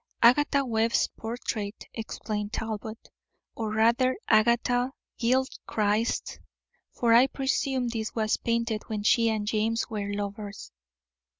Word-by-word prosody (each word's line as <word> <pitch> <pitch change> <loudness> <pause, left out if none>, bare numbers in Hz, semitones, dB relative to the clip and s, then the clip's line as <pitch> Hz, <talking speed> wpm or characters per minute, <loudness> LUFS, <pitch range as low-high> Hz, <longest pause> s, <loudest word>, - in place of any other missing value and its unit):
"Agatha 280 +3 +5
Webb's 225 -1 +1
portrait," 220 -2 -4
explained 210 -2 -4
Talbot, 220 0 -5 0.4
"or 220 -2 -3
rather 235 +4 +3
Agatha 240 +3 +3 0.3
Gilchrist's; 230 -3 0 0.5
for 235 -1 +2
I 245 +3 +7
presume 265 -1 -1
this 225 -2 -4
was 215 -1 +1
painted 230 -2 -1
when 215 -2 -3
she 230 +2 +4
and 215 -2 -1
James 220 +2 0
were 205 -2 -3
lovers." 205 0 -5
225 Hz, 110 wpm, -27 LUFS, 215-240 Hz, 0.5 s, I